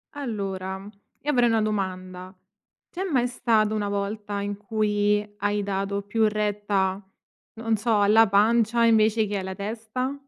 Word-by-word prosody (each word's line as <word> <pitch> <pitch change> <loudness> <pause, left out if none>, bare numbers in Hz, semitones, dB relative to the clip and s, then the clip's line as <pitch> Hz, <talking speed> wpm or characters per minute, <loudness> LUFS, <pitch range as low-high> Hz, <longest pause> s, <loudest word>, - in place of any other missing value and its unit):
Allora, 195 -6 -4 0.3
io 295 - 0
avrei 245 -4 +3
una 225 -1 +2
domanda: 185 -3 -4 0.5
c'è 370 - -4
mai 255 -9 +1
stata 220 -3 +1
una 210 -1 -1
volta 205 0 -3
in 205 0 -4
cui 210 -1 0
hai 205 0 -1
dato 200 0 -2
più 215 +2 +1
retta, 205 -2 -1 0.5
non 225 -1 -1
so, 220 0 +1
alla 220 +2 +6
pancia 225 +3 +3
invece 220 -1 +4
che 205 0 -3
alla 190 0 -4
testa? 225 +6 -4
210 Hz, 140 wpm, -25 LUFS, 200-225 Hz, 0.5 s, alla